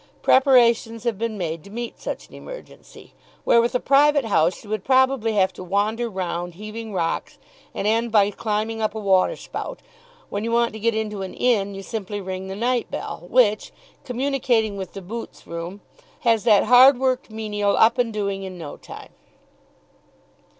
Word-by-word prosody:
Preparations 235 -4 +4
have 235 -5 -2
been 230 -2 -2
made 165 -3 -4
to - - -13
meet 235 +3 -6
such - - -5
an - - -21
emergency. - - -12 0.3
Where 235 - +5
with 240 +2 -1
a - - +3
private 285 0 +4
house 175 -5 +1
you 205 - -13
would 215 -3 -2
probably 260 -3 +2
have 190 -2 +2
to - - -9
wander 210 +6 -1
round 175 -3 -4
heaving 215 +3 -7
rocks 170 -4 -2 0.4
and - - -3
end 230 +2 +1
by 205 -2 +4
climbing 220 +2 -2
up 215 0 -1
a - - -3
water 195 - +2
spout, - - -7 0.5
when 205 +1 -3
you 230 - -2
want 235 -1 +2
to 220 - -7
get 230 +1 +1
into 210 -2 -3
an 190 - -6
inn 200 -5 +1
you 195 - -7
simply 205 -1 -5
ring 190 0 -5
the 190 - -5
night 240 +3 0
bell, 175 - -6
which, 215 -4 +3 0.3
communicating 250 -4 0
with 190 -2 -6
the 195 - -8
boots' 230 +6 -8
room, 170 +4 -7 0.4
has 230 -2 +2
that 210 -4 +5
hard 250 +3 +7
worked 260 0 0
menial 210 -2 -1
up 230 +3 +4
and 240 -2 +1
doing 200 -2 -2
in 190 -1 -7
no 160 -4 -8
time. - - -11
220 Hz, 180 wpm, -23 LUFS, 195-235 Hz, 0.5 s, hard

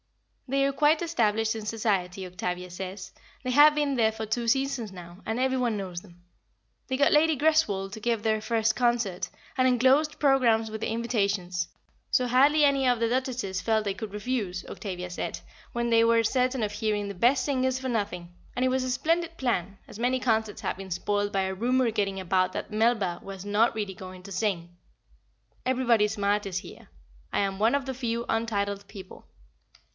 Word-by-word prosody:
They 275 +1 +2
are 275 - 0
quite 300 +3 +3
established 225 -9 +1
in 220 -1 -6
Society, 195 -4 -1
Octavia 180 0 -4
says; 190 +2 -7 0.3
they 255 - -1
have 295 +3 +7
been 290 -2 +1
there 225 -3 +3
for 220 0 -5
two 230 +2 -2
seasons 270 -4 0
now, 175 -1 -11
and 225 +2 -2
every 260 0 +1
one 240 -4 0
knows 185 -3 -5
them. 175 -3 -19 0.6
They 260 - -1
got 280 - +4
Lady 310 0 +4
Greswold 230 -11 +2
to 220 - -7
give 230 -2 0
their 220 -1 +1
first 220 0 +1
concert, 235 -7 0 0.3
and 255 - +3
enclosed 260 +5 +3
programmes 240 -6 +3
with 220 0 -6
the - - -1
invitations, 200 -6 -1 0.4
so 250 - +2
hardly 285 +5 +5
any 275 -1 +2
of 245 -2 +3
the 230 - +2
Duchesses 245 -6 -2
felt 220 +1 +1
they 200 - 0
could 205 +1 -7
refuse, 210 -4 -3
Octavia 180 -3 -6
said, 175 - -4 0.3
when 235 0 -1
they 230 -1 +5
were 230 0 +4
certain 255 +1 +1
of 210 - -1
hearing 210 -2 -1
the 200 - -5
best 250 +7 +2
singers 260 -2 0
for 260 - -4
nothing; 190 -7 -3 0.2
and 255 - +1
it - - +3
was 260 0 0
a 255 - -2
splendid 335 +5 0
plan, 200 -7 -1
as 205 - -11
many 250 +2 +1
concerts 220 -4 0
have - - -2
been 190 -1 -9
spoilt 205 +3 -1
by 195 - +1
a 190 0 -2
rumour 245 +4 +1
getting 200 -3 -1
about 185 0 +1
that - - -5
Melba 215 -5 +1
was 195 -1 -8
not 215 +3 +2
really 205 -3 -3
going 185 0 -10
to 200 - -10
sing. 180 -4 -2 0.9
Everybody 245 -4 +3
smart 205 0 0
is 185 -2 -3
here. - - -9 0.4
I - - 0
am 195 -1 -1
one 225 +5 +3
of 280 -2 -1
the 265 - -3
few 235 -2 -2
untitled 200 -3 -1
people. 190 -3 -11
220 Hz, 190 wpm, -27 LUFS, 195-255 Hz, 0.9 s, have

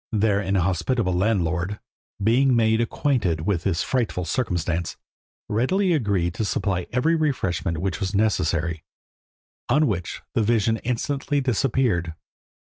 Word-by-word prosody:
Their 105 -2 +2
inhospitable 95 +3 0
landlord, 90 -1 0 0.4
being 125 +4 +4
made 110 0 +3
acquainted 115 - 0
with 90 0 0
this 95 -3 0
frightful 115 -8 -1
circumstance, 85 -7 -2 0.5
readily 175 - +1
agreed 100 - 0
to 115 - -2
supply 95 -3 -1
every 125 +7 +2
refreshment 100 - 0
which 95 +3 -2
was 95 0 -2
necessary, 85 -6 0 0.9
on 155 +1 +4
which 90 - -3
the - - +2
vision 110 0 +2
instantly 135 +5 -1
disappeared. 120 - 0
105 Hz, 120 wpm, -24 LUFS, 90-125 Hz, 0.9 s, being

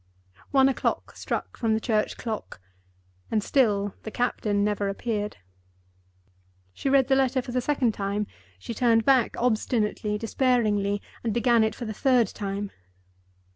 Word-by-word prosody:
One 270 -1 +5
o'clock 270 - -1
struck - - -4
from 225 -2 +1
the - - 0
church 215 -2 0
clock, 220 - -5 0.7
and 215 -2 0
still 205 -7 +2
the - - -6
captain 210 -3 0
never 205 -1 0
appeared. 210 0 -3 1.4
She 275 - -2
read 270 -1 +4
the 270 - +4
letter 265 0 +2
for 245 - -5
the 250 +1 0
second 250 -4 +1
time; 200 +1 -2 0.3
she 95 - -6
turned 230 -2 +3
back 260 -4 +3
obstinately, 215 -3 0
despairingly, 215 -4 +1 0.2
and 225 -3 -1
began 235 -1 +4
it 220 0 0
for 240 - -6
the 220 - -4
third 245 -2 +3
time. 200 -1 -4
225 Hz, 145 wpm, -26 LUFS, 210-250 Hz, 1.4 s, One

